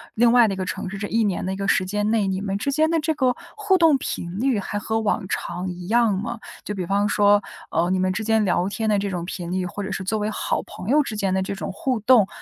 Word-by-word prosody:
另 235 +1 +5
外 240 -1 +6
的 195 - -1
一 - - -11
个 185 - -2
城 185 - -4
市， 195 - -6
这 205 +1 -3
1 225 +2 +1
年 200 -4 -1
的 190 +1 -2
时 195 - +2
间 210 +2 -1
内， 220 -2 +2
你 190 0 -1
们 200 -1 -2
之 280 +7 -1
间 310 +3 +2
的 330 0 +2
这 315 +1 0
个 260 -5 +1 0.2
互 415 -3 +2
动 325 -4 +5
频 175 -5 -4
率 255 -1 +2
还 205 +1 -3
和 220 +2 -1
往 215 -1 0
常 180 +1 -3
一 180 0 -7
样 230 -1 +3
吗？ 235 +2 -4 0.2
就 210 - -4
比 185 -4 -4
方 200 +2 +2
说， 205 -1 +4 0.3
呃， 170 +2 +1
你 185 - +1
们 185 0 +1
之 210 +4 -3
间 220 0 +2
聊 180 -1 +1
天 220 +2 -2
的 210 - +3
这 200 0 -2
种 175 -2 -3
频 175 -1 -5
率， 185 0 0
或 205 +3 -5
者 - - -4
是 190 - -3
作 215 +4 -1
为 210 0 -1
好 - - -1
朋 185 - -10
友 295 +3 +4
之 220 - -5
间 200 -2 0
的 190 - +1
这 195 - -3
种 195 - -5
互 245 +5 -1
动， 220 -2 +5
205 Hz, 300 characters per minute, -23 LUFS, 190-230 Hz, 0.3 s, 外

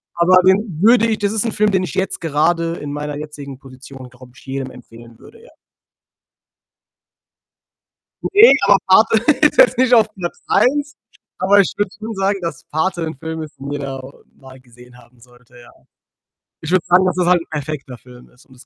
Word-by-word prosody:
aber 175 +2 +4
den 190 -2 +1
würde 230 +2 +5
ich 220 -1 -2
das 205 -1 -1
ist 220 +1 -2
'n 230 - -2
Film, 210 0 +1
den 190 -1 0
ich 180 - -6
jetzt 190 0 -3
gerade 165 +2 0
in 145 - -7
meiner 145 0 -5
jetzigen 145 -3 -9
Position, 130 -1 -13
glaube 125 0 -17
ich, - - -19
jedem 135 -1 -5
empfehlen 115 -1 -16
würde, 455 - -17
ja. - - -17 2.7
Ne, 415 +4 +6
aber 200 - +6
„Pate“ 215 +4 +4 0.3
ist 300 - +3
jetzt - - +4
nicht 255 -1 +4
auf 225 -2 +5
Platz 175 -3 -6
1, 285 +3 +1 0.4
aber 200 +2 +4
ich 195 - 0
würde 205 -2 -1
schon 220 +1 -7
sagen, 195 0 -1
dass 165 -5 -6
„Pate“ 175 +3 -2
'n 160 - -5
Film 160 +1 -6
ist, 155 - -11
den 140 +1 -8
jeder 135 -2 -5 0.3
mal 130 -1 -15
gesehen 125 0 -19
haben 125 -1 -22
sollte, 120 0 -21
ja. 120 - -16 0.9
Ich 160 - -6
würde 185 -2 +1
sagen, 180 +2 +4
dass 185 - -1
es 180 - +1
halt 180 -1 +3
'n - - -14
perfekter 145 -4 -6
Film 125 0 -17
ist 125 - -24
und 130 - -21
das 125 - -18
160 Hz, 195 wpm, -18 LUFS, 135-195 Hz, 2.7 s, Ne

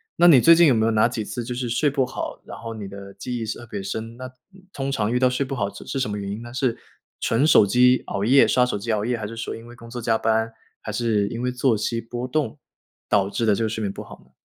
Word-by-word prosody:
那 175 - +5
你 150 -7 +8
最 165 +6 +7
近 170 -1 +6
有 130 - +5
没 110 -1 +2
有 115 - +2
哪 110 +1 +4
几 115 -3 -4
次 120 +2 -5
就 125 - -5
是 125 0 -3
睡 145 +6 +2
不 135 -2 +1
好， 130 - -6
然 - - -9
后 115 0 -7
你 105 -3 -6
的 100 0 -10
记 120 +5 -5
忆 115 - -3
是 110 - -4
特 120 - -10
别 100 - -5
深， 110 +3 -5
那 130 0 -8 0.4
通 135 -4 -3
常 110 -3 0
遇 125 - +1
到 130 0 +4
睡 125 +2 -1
不 135 - -5
好 100 -5 -1
是 - - -11
是 135 - -3
什 125 - -1
么 105 - -3
原 100 -1 -4
因 105 +3 -5
呢？ 120 0 -10
是 130 -3 0 0.4
纯 115 +6 +1
手 130 -9 +6
机 125 +5 +4
熬 100 - -3
夜 135 +5 +6
刷 125 -1 +3
手 125 - -2
机 105 +4 -7
熬 105 - 0
夜， 120 +1 -1
还 105 - -5
是 115 - -8
说 115 - -4
因 115 - -11
为 120 - -12
工 115 -1 -13
作 120 +1 -6
加 115 -1 +2
班， 110 0 0 0.3
还 105 - -5
是 110 -3 +1
因 115 +3 -5
为 125 - -1
作 125 -1 +2
息 115 +2 -2
波 120 +2 -5
动， 130 -3 -1 0.5
导 100 -1 +2
致 115 - -1
的 105 - +4
这 115 - -1
个 - - -1
睡 110 0 -4
眠 100 -2 -1
不 - - -8
好 - - -12
呢？ - - -29
115 Hz, 325 characters per minute, -23 LUFS, 110-125 Hz, 0.5 s, 你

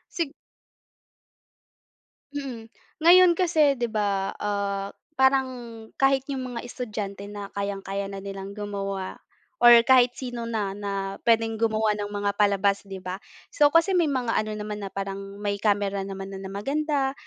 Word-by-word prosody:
Sig 320 -4 -2 2.0
Mm. 265 -6 -5 0.4
Ngayon 360 +1 +8
kasi 315 -6 +3
'di 240 -2 -2
ba, 200 -3 0
ah, 200 -1 -1 0.3
parang 265 0 +4 0.5
kahit 270 -1 +3
yung 265 -1 -3
mga 245 -1 -6
estudyante 210 -5 -5
na 205 -1 -8
kayang-kaya 200 0 -3
na 195 0 -7
nilang 195 0 -7
gumawa 195 -2 -4 0.4
or 240 - +10 0.2
kahit 255 -2 +6
sino 245 -2 -5
na, 205 -4 -2
na 195 -1 -4
pwedeng 225 -1 +3
gumawa 220 -1 +2
ng 205 0 -4
mga 205 0 -1
palabas, 200 -1 +3
'di 195 -1 -6
ba? 185 +2 -5 0.3
So, 295 -1 +5
kasi 330 +5 +4
may 345 -3 +3
mga 250 -4 0
ano 215 0 0
naman 210 0 -5
na 195 - -4
parang 195 0 -6
may 205 -1 -2
camera 200 -2 +1
naman 195 0 -6
na, 190 - -6
na 190 - -7
maganda 275 +6 -1
205 Hz, 150 wpm, -25 LUFS, 195-255 Hz, 2.0 s, or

